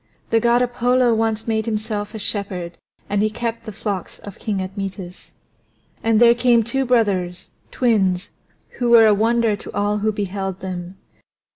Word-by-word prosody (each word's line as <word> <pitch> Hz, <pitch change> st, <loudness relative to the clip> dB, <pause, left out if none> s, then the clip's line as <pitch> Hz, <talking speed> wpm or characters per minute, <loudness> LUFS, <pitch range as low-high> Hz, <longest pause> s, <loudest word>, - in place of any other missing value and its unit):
The 225 Hz, -, +4 dB
God 240 Hz, +2 st, +3 dB
Apollo 245 Hz, 0 st, +2 dB
once 225 Hz, 0 st, -1 dB
made 220 Hz, 0 st, 0 dB
himself 215 Hz, -1 st, -3 dB
a -, -, -3 dB
shepherd 195 Hz, -5 st, -4 dB, 0.3 s
and 205 Hz, 0 st, 0 dB
he 215 Hz, -, +2 dB
kept 230 Hz, +1 st, -4 dB
the -, -, -4 dB
flocks 200 Hz, -3 st, -5 dB
of 200 Hz, -2 st, -11 dB
King 205 Hz, -3 st, -2 dB
Admetus. 190 Hz, -1 st, -6 dB, 0.7 s
And 225 Hz, -1 st, +3 dB
there 235 Hz, 0 st, +7 dB
came 240 Hz, -1 st, +3 dB
two 265 Hz, +4 st, -1 dB
brothers, 190 Hz, -7 st, 0 dB, 0.2 s
twins, 195 Hz, -7 st, +1 dB, 0.5 s
who 245 Hz, -1 st, +1 dB
were 230 Hz, -1 st, +8 dB
a 215 Hz, -, +6 dB
wonder 225 Hz, +1 st, +2 dB
to -, -, -10 dB
all 205 Hz, +1 st, 0 dB
who 215 Hz, +1 st, +1 dB
beheld 195 Hz, -2 st, -4 dB
them. 180 Hz, 0 st, -6 dB
215 Hz, 160 wpm, -21 LUFS, 195-235 Hz, 0.7 s, were